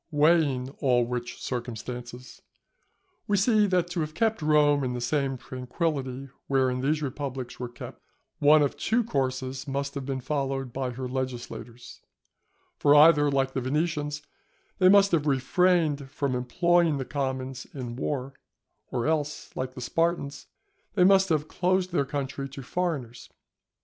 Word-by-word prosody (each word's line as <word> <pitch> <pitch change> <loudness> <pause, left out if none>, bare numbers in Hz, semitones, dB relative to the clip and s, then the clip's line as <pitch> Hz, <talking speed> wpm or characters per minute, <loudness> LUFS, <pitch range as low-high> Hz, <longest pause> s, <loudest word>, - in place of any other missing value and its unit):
Weighing 145 -4 +2
all 125 -3 +3
which 120 0 -5
circumstances, 120 0 -6 0.9
we 205 - +2
see 210 +1 +4
that 180 -2 +1
to 175 - -2
have 155 0 -3
kept 220 0 +1
Rome 150 -2 +3
in 125 -1 -1
the 125 - -3
same 135 +1 -1
tranquility 130 +1 -3 0.2
wherein 130 -2 +1
these 150 +3 0
republics 135 -2 -5
were 125 -1 -4
kept, 120 - -10 0.4
one 150 +1 +6
of 140 - -1
two 235 +3 +1
courses 130 - -2
must 140 +1 -2
have 140 -2 -4
been 135 0 -3
followed 135 -2 -2
by 130 -1 -2
her 125 +1 -5
legislators; 125 -2 -6 0.8
for 145 0 +5
either, 150 -1 +7
like 135 -1 0
the 130 - -1
Venetians, 150 +2 -1 0.6
they 185 -1 +6
must 200 0 +6
have 155 -3 +1
refrained 150 0 +2
from 140 -1 -2
employing 170 +5 +2
the 135 - -3
commons 130 -2 -3
in 125 -4 -6
war, 135 0 -3 0.6
or 120 -2 -2
else, 150 -2 -2
like 130 0 -4
the 125 - -7
Spartans, 165 0 -1 0.5
they 185 - +4
must 195 0 +5
have 155 -2 +1
closed 185 +1 0
their 140 -5 +1
country 140 0 -4
to 135 0 -9
foreigners. 135 -7 -3
140 Hz, 150 wpm, -27 LUFS, 130-155 Hz, 0.9 s, either